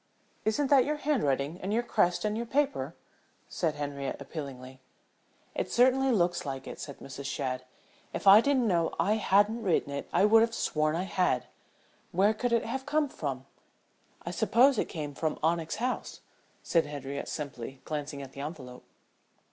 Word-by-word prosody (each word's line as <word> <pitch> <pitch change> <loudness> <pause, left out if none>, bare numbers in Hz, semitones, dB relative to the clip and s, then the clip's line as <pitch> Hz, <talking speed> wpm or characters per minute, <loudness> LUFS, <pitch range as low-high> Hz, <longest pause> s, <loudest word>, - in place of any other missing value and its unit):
"Isn't 265 +6 +1
that 270 -3 +7
your 300 +3 -1
handwriting 165 - 0
and 190 - -3
your 235 +3 +1
crest 180 -4 +1
and 210 0 0
your 235 +1 -3
paper?" 285 +2 0 0.5
asked - - -9
Henriette, 140 -2 -4
appealingly. 130 -4 -8 0.7
"It - - -3
certainly 260 +2 +4
looks 175 -5 +1
like 135 -2 -5
it," - - -8
said 140 - -7
Mrs. 135 +1 -9
Shadd. 130 -2 -3 0.5
"If - - -5
I 200 +2 +9
didn't 265 -2 +2
know 170 -6 +1
I 210 +2 +2
hadn't 210 +2 +3
written 175 -8 +1
it 140 - -5
I 200 - +4
would 220 +1 +6
have 230 0 +1
sworn 155 0 0
I 175 - -1
had. 180 - 0 0.7
Where 200 +5 +3
could 245 +2 -2
it 235 -1 +2
have 265 +3 -4
come 300 -1 +1
from?" 135 - -4 0.8
"I 170 - -3
supposed 235 +6 +4
it - - +1
came 150 -3 -5
from 155 +2 -2
Onyx 165 0 +1
House," 245 +3 -3 0.4
said 165 -3 +2
Henriette 140 -1 -5
simply, 135 -3 -6
glancing 145 -2 -4
at 135 - -10
the 140 - -8
envelope. 135 -5 -7
175 Hz, 170 wpm, -29 LUFS, 140-230 Hz, 0.8 s, I